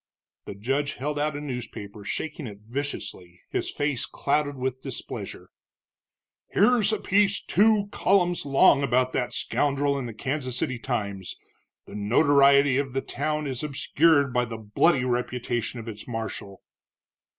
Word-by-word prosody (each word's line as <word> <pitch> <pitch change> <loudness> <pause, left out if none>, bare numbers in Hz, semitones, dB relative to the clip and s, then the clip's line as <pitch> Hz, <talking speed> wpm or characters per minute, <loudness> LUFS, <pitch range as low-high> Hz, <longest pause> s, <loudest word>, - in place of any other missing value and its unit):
The - - -7
judge 135 +7 -1
held 145 +3 -3
out 150 0 0
a - - -4
newspaper, 115 -6 -7
shaking 150 +6 -4
it 100 -1 -10
viciously, 110 -7 -6
his - - -1
face 145 -4 -1
clouded 145 0 -1
with 130 0 -3
displeasure. - - -6 1.0
"Here's 230 -4 +4
a 215 - 0
piece 200 +1 +2
two 210 0 +3
columns 180 -2 +2
long 140 0 +5
about 130 -1 +1
that 125 -1 -1
scoundrel 140 0 0
in 125 - -4
the 115 - -7
Kansas 130 0 -2
City 130 -2 -1
Times 100 -7 -3 0.5
the - - -13
notoriety 140 +5 +4
of 135 -3 -3
the 135 - 0
town 150 +2 -2
is 130 -3 -3
obscured 145 -1 +2
by 125 0 +2
the 115 -1 -6
bloody 125 +6 +2
reputation 125 -1 -2
of 115 - -9
its 105 -2 -7
marshal." 110 -4 -6
135 Hz, 145 wpm, -26 LUFS, 120-145 Hz, 1.0 s, long